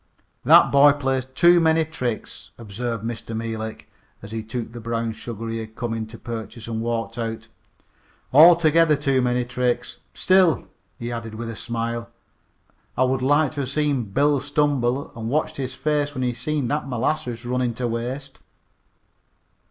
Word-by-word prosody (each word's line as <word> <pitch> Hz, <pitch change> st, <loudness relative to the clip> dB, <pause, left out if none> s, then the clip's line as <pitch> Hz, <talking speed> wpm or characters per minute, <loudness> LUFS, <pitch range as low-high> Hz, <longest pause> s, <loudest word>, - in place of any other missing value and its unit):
"That -, -, +7 dB
boy 140 Hz, +1 st, +7 dB
plays 135 Hz, -2 st, -1 dB
too 175 Hz, +7 st, +4 dB
many 160 Hz, -1 st, +3 dB
tricks," 120 Hz, -, -5 dB
observed 115 Hz, +1 st, -5 dB
Mr. 115 Hz, -1 st, -5 dB
Meelik 110 Hz, -1 st, -5 dB, 0.4 s
as 100 Hz, -, -9 dB
he 110 Hz, 0 st, -3 dB
took 115 Hz, +2 st, -5 dB
the 120 Hz, -, -8 dB
brown 115 Hz, 0 st, -2 dB
sugar 115 Hz, 0 st, -7 dB
he 115 Hz, 0 st, -3 dB
had 110 Hz, 0 st, -8 dB
come 120 Hz, -2 st, -3 dB
in 110 Hz, -1 st, -4 dB
to 115 Hz, +1 st, -11 dB
purchase 110 Hz, -1 st, -7 dB
and 110 Hz, -1 st, -3 dB
walked 115 Hz, +1 st, -3 dB
out. 115 Hz, -1 st, -4 dB, 0.8 s
"Altogether 165 Hz, 0 st, +6 dB
too 140 Hz, -2 st, +1 dB
many 125 Hz, 0 st, +1 dB
tricks. 125 Hz, 0 st, -2 dB, 0.2 s
Still," 185 Hz, -7 st, +3 dB, 0.3 s
he 120 Hz, 0 st, -5 dB
added 115 Hz, -2 st, -6 dB
with 115 Hz, +1 st, -5 dB
a -, -, -8 dB
smile, 115 Hz, 0 st, -4 dB, 0.9 s
"I 130 Hz, -, +4 dB
would 130 Hz, 0 st, +1 dB
like 145 Hz, +2 st, +3 dB
to 145 Hz, -, -6 dB
have 135 Hz, -3 st, -2 dB
seen 145 Hz, -4 st, 0 dB
Bill 140 Hz, +8 st, +2 dB
stumble 140 Hz, -2 st, 0 dB
and 115 Hz, -1 st, -4 dB
watched 155 Hz, +4 st, -1 dB
his 130 Hz, -1 st, -4 dB
face 145 Hz, +1 st, -1 dB
when 130 Hz, -, -2 dB
he 125 Hz, -1 st, 0 dB
seen 140 Hz, +2 st, -2 dB
that 145 Hz, -2 st, -2 dB
molasses 125 Hz, -1 st, -2 dB
runnin' 125 Hz, -1 st, -1 dB
to 125 Hz, 0 st, -2 dB
waste." 125 Hz, +4 st, -5 dB
125 Hz, 165 wpm, -23 LUFS, 115-145 Hz, 0.9 s, That